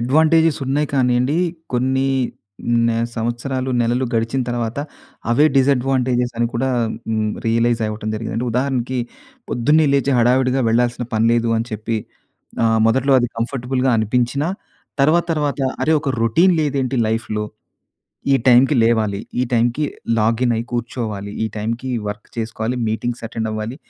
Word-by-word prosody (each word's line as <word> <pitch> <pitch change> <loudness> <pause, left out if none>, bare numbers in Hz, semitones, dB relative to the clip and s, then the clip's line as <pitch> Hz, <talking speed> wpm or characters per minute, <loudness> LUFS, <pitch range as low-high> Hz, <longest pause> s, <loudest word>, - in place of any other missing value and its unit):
Advantages 160 +5 +3
ఉన్నాయి 145 +3 +1
కానియండి, 125 +3 +2 0.3
కొన్ని 130 +2 +1 0.8
నే 115 - 0 0.2
సంవత్సరాలు, 125 +3 -2
నెలలు 120 +2 +1
గడిచిన 115 +3 0
తర్వాత 120 0 -2 0.5
అవే 125 +6 +4
డిసాడ్వాంటేజెస్ 130 -2 +2
అని 120 - +2
కూడా 130 +3 0 0.4
హ్మ్, 110 -1 0 0.2
రియలైజ్ 115 0 +2
అవ్వటం 105 0 -4
జరిగిందండి. 115 +2 -3
ఉదాహరణకి, 130 0 -1 0.5
పొద్దున్నే 150 +6 +3
లేచి 140 0 +2
హడావిడిగా 130 +2 +3
వెళ్ళాల్సిన 120 +1 +1
పని 110 +1 +2
లేదు 115 -1 +1
అని 115 - -2
చెప్పి 110 +2 -2 0.7
ఆహ్, 115 -1 +3
మొదట్లో 130 +4 +2
అది 120 - +1
కంఫర్టబుల్‌గా 125 +2 -1
అనిపించినా 125 +7 0 0.5
తర్వాత 155 +5 +4
తర్వాత, 145 -3 -1 0.2
అరే! 160 - +2
ఒక 145 - -3
రోటీన్ 165 - +4
లేదేంటి 135 -3 -1
లైఫ్‌లో. 110 -1 -2 0.9
ఈ - - +6
టైమ్‌కి 130 +4 +6
లేవాలి, 110 -3 +1 0.2
ఈ - - +3
టైంకి 120 +5 +1 0.4
లాగినై 115 +1 +1
కూర్చోవాలి, 110 -4 -4
ఈ - - +1
టైంకి 115 +4 -3 0.2
వర్క్ 105 0 -6
చేసుకోవాలి, 110 +1 -2
మీటింగ్స్ 115 +2 -3
అటెండ్ 110 0 -3
అవ్వాలి, 110 +3 -4
120 Hz, 130 wpm, -19 LUFS, 115-135 Hz, 0.9 s, ఈ